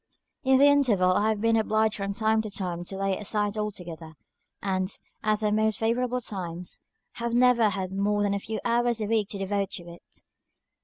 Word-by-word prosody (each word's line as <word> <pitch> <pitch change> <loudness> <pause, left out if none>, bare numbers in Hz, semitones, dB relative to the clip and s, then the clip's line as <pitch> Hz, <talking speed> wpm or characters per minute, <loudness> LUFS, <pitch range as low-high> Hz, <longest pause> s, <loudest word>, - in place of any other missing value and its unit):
In 265 -1 +5
the 280 - +6
interval 245 -11 +4
I 205 +4 +2
have 215 -2 0
been 230 0 +3
obliged 220 -1 +2
from 200 0 -3
time 220 0 +2
to 215 - -6
time 180 -3 -4
to 195 - -6
lay 195 0 0
it 190 - -2
aside 210 0 0
altogether; 175 -6 -5 0.5
and, 185 -1 -1 0.3
at 215 0 +1
the 210 -1 +1
most 215 0 +2
favourable 245 +2 0
times, 180 -5 -5 0.4
have 235 0 -1
never 245 -3 +5
had 190 -1 -3
more 205 +1 +1
than 200 -1 +1
a 200 - -1
few 220 +2 -5
hours 240 0 +2
a 215 - -1
week 215 -1 +1
to 200 - -5
devote 195 0 -1
to 175 - -5
it. 170 0 -14
210 Hz, 200 wpm, -27 LUFS, 195-225 Hz, 0.5 s, the